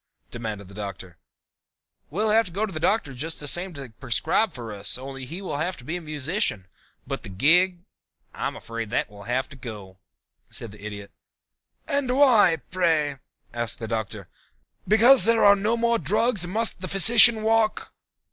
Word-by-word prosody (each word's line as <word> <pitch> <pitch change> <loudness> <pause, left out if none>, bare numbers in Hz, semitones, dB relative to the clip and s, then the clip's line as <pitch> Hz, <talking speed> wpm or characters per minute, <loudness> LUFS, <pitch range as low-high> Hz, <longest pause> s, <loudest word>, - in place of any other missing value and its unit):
demanded 110 -4 -6
the 100 - -14
Doctor. 95 -4 -8 0.9
"We'll 210 +7 0
have 220 -4 +2
to 190 - -7
have 215 -2 -2
the 155 - -4
Doctor 160 -5 0
just 155 +6 -5
the 145 - -8
same 180 +6 -1
to 135 -5 -10
prescribe 135 - 0
for 115 -6 -8
us, 100 +2 -2
only 135 0 -8
he 170 +9 -8
will 175 - -4
have 175 +5 -3
to - - -13
be 155 +7 -5
a 180 - -5
musician, 150 - -2 0.4
but - - -5
the - - -10
gig 175 - +2 0.5
I'm - - -4
afraid 115 -2 -7
that 105 -2 -2
will 100 -1 -13
have 130 +2 -2
to 140 - -13
go," 105 -7 -10 0.5
said 115 - -7
the 105 0 -15
Idiot. 100 -1 -8 0.8
"And 270 -2 -1
why, 220 - +4
pray?" 160 -6 0 0.3
asked 120 -1 -2
the 115 - -7
Doctor. 110 -4 -5 0.6
"Because 235 +5 +6
there 230 -1 +3
are 200 0 +7
no 215 +4 0
more 235 0 +1
drugs 210 - +1
must 220 +1 -1
the 185 - -4
physician 220 +3 +7
walk?" 225 0 0
155 Hz, 175 wpm, -24 LUFS, -, 0.9 s, are